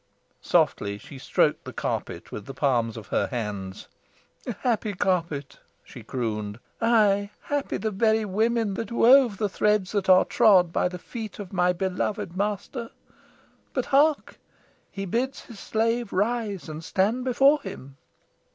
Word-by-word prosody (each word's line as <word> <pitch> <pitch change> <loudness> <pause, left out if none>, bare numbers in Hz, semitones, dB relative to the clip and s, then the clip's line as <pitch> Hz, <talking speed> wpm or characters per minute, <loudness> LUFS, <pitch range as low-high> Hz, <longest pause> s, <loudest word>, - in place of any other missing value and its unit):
Softly 100 0 +1
she 135 +6 -12
stroked - - +1
the - - -7
carpet - - -4
with 105 - -7
the 135 - -8
palms 120 -5 +1
of 110 - -10
her - - +1
hands. 105 -6 -5 0.7
"Happy 225 -4 0
carpet!" 170 -7 -1 0.2
she - - -12
crooned. 105 -4 -3 0.2
"Aye, 210 -3 +3
happy 285 -1 -2
the 220 - -2
very 220 +2 +2
women 220 +1 0
that 220 +2 -5
wove 240 -2 +5
the 210 - 0
threads 210 -1 +1
that 200 -3 -1
are 185 0 +7
trod 190 -7 +4
by - - +2
the 180 0 -6
feet 220 +3 -8
of 200 -2 -8
my 180 -1 +3
beloved 185 0 -2
master. 210 +4 -3 0.8
But - - -1
hark! 295 +2 +3 0.5
he 195 0 -5
bids 245 +8 -2
his 230 -5 -12
slave 230 +1 -1
rise 210 -2 -1
and 155 +1 -7
stand 210 +9 0
before 270 +4 +4
him!" 140 -9 -9
200 Hz, 145 wpm, -25 LUFS, 170-230 Hz, 0.8 s, are